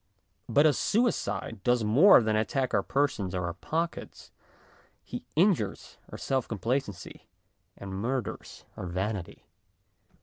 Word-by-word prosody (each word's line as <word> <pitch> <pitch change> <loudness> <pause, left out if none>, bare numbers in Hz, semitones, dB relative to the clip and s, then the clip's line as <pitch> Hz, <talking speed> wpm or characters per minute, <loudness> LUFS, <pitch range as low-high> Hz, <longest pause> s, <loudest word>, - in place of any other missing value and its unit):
But 140 +6 +4
a 155 - +5
suicide 120 - 0
does 120 0 +2
more 125 - +7
than 110 0 +1
attack 130 +4 0
our 100 - +3
persons 105 -7 -1
or 90 -1 -1
our 85 - -3
pockets; 165 - -4 0.7
he - - -7
injures 160 - +1
our - - -7
self 130 -2 -1
complacency 115 -3 -4 0.5
and 100 -1 -8
murders 120 +6 -4
our 90 - -6
vanity. 95 +1 -4
115 Hz, 125 wpm, -28 LUFS, 100-140 Hz, 0.7 s, more